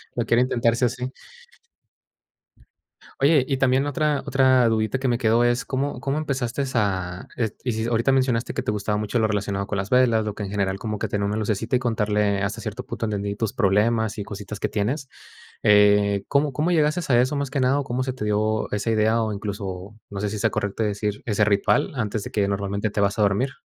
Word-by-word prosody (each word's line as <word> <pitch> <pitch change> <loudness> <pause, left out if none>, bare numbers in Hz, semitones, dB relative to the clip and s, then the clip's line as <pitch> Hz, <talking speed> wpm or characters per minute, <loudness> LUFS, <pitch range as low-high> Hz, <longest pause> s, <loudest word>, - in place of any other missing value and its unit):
lo 120 - -1
quiero 120 +1 +3
intentar, 120 -2 +2
sí 120 - -2
o - - +3
sí. 125 +3 -5 2.1
Oye, 140 -1 +4
y 135 - +1
también 135 +1 +2
otra 145 0 0
otra 130 -3 +4
dudita 110 +3 0
que 135 - -1
me 120 -1 +2
quedó 115 0 +3
es, 120 +1 +1
¿cómo 140 +2 -3
cómo 140 +2 -1
empezaste 140 -3 -2
a? 95 -5 -1
Es- 110 -3 -1
y 125 - 0
sí 110 0 -2
ahorita 115 +3 +2
mencionaste 130 -3 +1
que 130 - -2
te 125 - -1
gustaba 105 0 -1
mucho 105 +3 -1
lo 110 - +3
relacionado 100 -1 -2
con 100 - -2
las 100 +1 -3
velas, 120 -4 +3
lo 105 -1 -4
que 105 - -5
en 95 - -5
general 100 -2 -1
como 105 -2 -4
que - - -1
tenía 100 0 -2
como - - +1
una 110 - -1
lucecita 110 +3 0
y - - -3
contarle 105 -4 0
ah, - - +1
hasta 100 - -6
cierto - - -6
punto 115 - -4
entendí 100 -1 -2
tus 110 -3 -2
problemas 110 +1 +1
y 105 - -4
cositas 100 0 -7
que - - 0
tienes, 125 +8 -2 0.6
eh, 105 -1 +4
¿cómo 145 +1 +2
cómo 155 +6 0
llegaste 155 0 +2
a 120 - +6
eso 130 +3 0
más 140 -2 -2
que 135 -1 -1
nada? 130 +3 +3
¿O 140 - -3
cómo 125 +1 -2
se 130 - -2
te 115 -4 -5
dio 110 +1 0
esa 105 +2 -1
idea, 110 +1 +2
o 110 -1 -1
incluso, 100 -1 -5
no 100 - -6
sé 105 - -1
si 105 - -4
sea - - +1
correcto 105 +2 -2
decir, 105 0 -2
ese 105 -2 +2
ritual 105 +9 +2
antes 110 -3 -2
de - - -7
que 105 -2 +1
normalmente 100 +1 -2
te 105 - -4
vas 100 0 +1
a - - +1
dormir? 105 +7 +1
110 Hz, 230 wpm, -23 LUFS, 105-130 Hz, 2.1 s, a